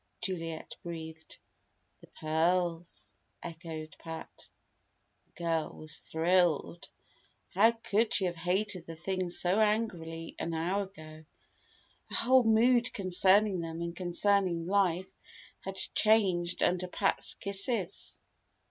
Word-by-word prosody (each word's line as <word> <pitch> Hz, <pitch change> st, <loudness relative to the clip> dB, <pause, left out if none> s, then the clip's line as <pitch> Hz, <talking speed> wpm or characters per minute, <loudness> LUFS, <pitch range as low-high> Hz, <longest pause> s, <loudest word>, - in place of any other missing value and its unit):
Juliet 165 Hz, -6 st, -5 dB
breathed. 160 Hz, -1 st, -8 dB, 0.6 s
"The -, -, -17 dB
pearls!" 170 Hz, +2 st, -1 dB, 0.3 s
echoed 160 Hz, -2 st, -7 dB
Pat. 165 Hz, -1 st, -9 dB, 0.8 s
The -, -, -37 dB
girl 165 Hz, -2 st, -2 dB
was 155 Hz, 0 st, -3 dB
thrilled. 170 Hz, 0 st, +1 dB, 0.6 s
How 210 Hz, +5 st, +5 dB
could 225 Hz, -1 st, 0 dB
she 195 Hz, -, +2 dB
have 175 Hz, -, -1 dB
hated 180 Hz, +1 st, -1 dB
the 165 Hz, -, -7 dB
things 185 Hz, +1 st, -2 dB
so 180 Hz, +4 st, +2 dB
angrily 180 Hz, -7 st, -1 dB
an 165 Hz, 0 st, -3 dB
hour 185 Hz, +5 st, 0 dB
ago? 155 Hz, -5 st, -13 dB, 0.9 s
Her -, -, -4 dB
whole 255 Hz, 0 st, +4 dB
mood 235 Hz, +2 st, +4 dB
concerning 190 Hz, +1 st, +3 dB
them 165 Hz, 0 st, -5 dB
and 170 Hz, 0 st, -5 dB
concerning 180 Hz, -1 st, +1 dB
life 185 Hz, -1 st, +1 dB, 0.5 s
had 195 Hz, 0 st, -7 dB
changed 190 Hz, -4 st, +2 dB
under 180 Hz, 0 st, +1 dB
Pat's -, -, 0 dB
kisses. 200 Hz, -1 st, -1 dB
180 Hz, 110 wpm, -31 LUFS, 165-200 Hz, 0.9 s, How